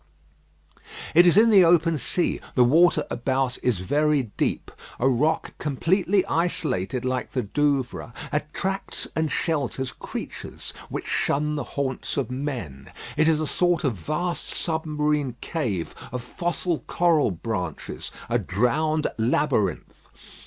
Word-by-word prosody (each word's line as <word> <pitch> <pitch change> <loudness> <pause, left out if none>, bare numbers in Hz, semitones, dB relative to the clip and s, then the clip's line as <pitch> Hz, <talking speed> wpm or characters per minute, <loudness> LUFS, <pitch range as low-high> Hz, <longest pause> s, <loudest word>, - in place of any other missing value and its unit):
It 175 +2 +7
is 175 - +5
in 225 +1 +7
the 195 -3 +8
open 165 -2 +4
sea; 175 - 0
the 125 - +6
water 155 +4 +4
about 130 +1 0
is 115 -8 +1
very 145 +1 +1
deep. - - -1 0.3
A 130 - +3
rock 145 +5 +1
completely 180 +7 +1
isolated 125 - -1
like 130 0 -1
the 130 -3 0
Douvres 135 +1 0 0.2
attracts 190 +6 -2
and 160 -1 +1
shelters 140 -5 -1
creatures - - -7 0.2
which - - -4
shun 150 +2 +1
the 145 - -2
haunts 135 -2 -2
of 130 -4 -1
men. 125 - -5 0.2
It 155 +1 +3
is 160 -2 +3
a 155 - 0
sort 175 +2 +1
of 135 -5 +1
vast 170 - -2
submarine 150 -4 -1
cave 115 - -2 0.2
of 125 -1 -4
fossil 175 +3 -2
coral 170 -6 +3
branches 90 -3 -4 0.2
a - - +1
drowned 150 +10 +1
labyrinth. 110 - 0
145 Hz, 130 wpm, -25 LUFS, 125-160 Hz, 0.3 s, the